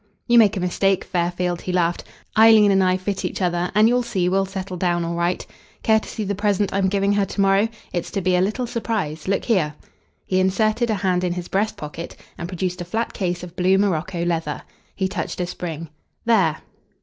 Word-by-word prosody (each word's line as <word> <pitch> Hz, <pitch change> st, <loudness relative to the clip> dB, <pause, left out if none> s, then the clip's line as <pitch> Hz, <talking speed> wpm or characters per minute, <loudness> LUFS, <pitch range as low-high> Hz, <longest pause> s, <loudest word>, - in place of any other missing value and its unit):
"You 240 Hz, -1 st, +6 dB
make 210 Hz, -3 st, +4 dB
a -, -, 0 dB
mistake, 185 Hz, +1 st, +1 dB
Fairfield," 175 Hz, 0 st, -1 dB
he 185 Hz, -, -4 dB
laughed. 175 Hz, -1 st, +1 dB, 0.3 s
"Eileen 220 Hz, -2 st, +7 dB
and 195 Hz, -1 st, +4 dB
I 185 Hz, 0 st, +3 dB
fit 190 Hz, +1 st, -3 dB
each -, -, -3 dB
other, 175 Hz, -1 st, 0 dB
and 215 Hz, +1 st, +6 dB
you'll 245 Hz, +1 st, +3 dB
see 195 Hz, -7 st, -1 dB
we'll 195 Hz, +1 st, +1 dB
settle 190 Hz, -1 st, -5 dB
down 175 Hz, -1 st, 0 dB
all 170 Hz, -, -2 dB
right. 170 Hz, +1 st, -1 dB, 0.4 s
Care 220 Hz, 0 st, +4 dB
to -, -, -11 dB
see 220 Hz, -, -4 dB
the 200 Hz, 0 st, -1 dB
present 205 Hz, 0 st, 0 dB
I'm 195 Hz, -1 st, +2 dB
giving 200 Hz, +1 st, +1 dB
her 205 Hz, -1 st, +2 dB
to 200 Hz, -, -7 dB
morrow? 195 Hz, +2 st, +3 dB, 0.2 s
It's 175 Hz, -2 st, -2 dB
to 195 Hz, -, -1 dB
be 185 Hz, 0 st, +2 dB
a 180 Hz, -, +3 dB
little 215 Hz, +6 st, 0 dB
surprise. 215 Hz, -10 st, -3 dB
Look 195 Hz, 0 st, 0 dB
here!" 170 Hz, -11 st, +1 dB, 0.5 s
He 185 Hz, -, +1 dB
inserted 215 Hz, +5 st, +1 dB
a 215 Hz, -, +2 dB
hand 185 Hz, -2 st, 0 dB
in 180 Hz, -1 st, 0 dB
his 175 Hz, -1 st, -5 dB
breast 210 Hz, +3 st, 0 dB
pocket 155 Hz, +3 st, -7 dB, 0.2 s
and 170 Hz, -, -6 dB
produced 180 Hz, 0 st, -3 dB
a -, -, -4 dB
flat 225 Hz, +6 st, -2 dB
case 180 Hz, -2 st, -2 dB
of 180 Hz, -1 st, -9 dB
blue 185 Hz, +1 st, +3 dB
Morocco 180 Hz, -2 st, 0 dB
leather. 165 Hz, -3 st, -2 dB, 0.3 s
He 190 Hz, -, 0 dB
touched 185 Hz, -3 st, -4 dB
a 180 Hz, -, 0 dB
spring: 165 Hz, -2 st, -6 dB, 0.4 s
"There!" 190 Hz, -10 st, +3 dB
185 Hz, 215 wpm, -22 LUFS, 175-205 Hz, 0.5 s, Eileen